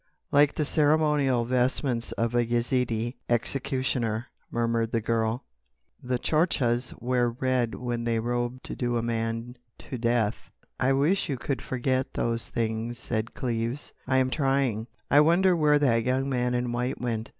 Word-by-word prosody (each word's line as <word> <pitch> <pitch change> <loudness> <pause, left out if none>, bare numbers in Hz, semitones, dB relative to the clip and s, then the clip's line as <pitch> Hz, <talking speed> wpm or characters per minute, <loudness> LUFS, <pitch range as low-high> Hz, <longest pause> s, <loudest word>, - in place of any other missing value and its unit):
"Like 145 0 +4
the 150 - 0
ceremonial 150 -5 +2
vestments 125 0 0
of 115 0 -1
a 120 0 +3
Yezidee 120 0 0
executioner," 125 -2 -1 0.2
murmured 115 -1 0
the 115 - +3
girl. 115 +2 0 0.6
"The 125 0 -1
Tchortchas 130 -5 +1
wear 120 0 +1
red 125 -1 0
when 120 -1 -3
they 115 -1 +1
robe 120 +2 -2
to - - -6
do 120 -1 -1
a 115 - -1
man 115 +1 -2 0.2
to 130 - -7
death." 115 -2 0 0.3
"I 135 +1 +3
wish 155 +9 +2
you 135 - -1
could 135 +2 -3
forget 130 +1 -1
those 115 -1 -1
things," 115 +1 -2
said 115 -1 -3
Cleves. 120 +1 -3
"I 130 0 +2
am 130 0 +2
trying.... 135 -6 +1 0.2
I 145 - +7
wonder 175 +4 +5
where 150 -2 +4
that 120 -6 +2
young 130 +2 0
man 125 -2 0
in 120 0 -1
white 125 +2 -2
went." 115 -2 -3
125 Hz, 155 wpm, -27 LUFS, 115-135 Hz, 0.6 s, I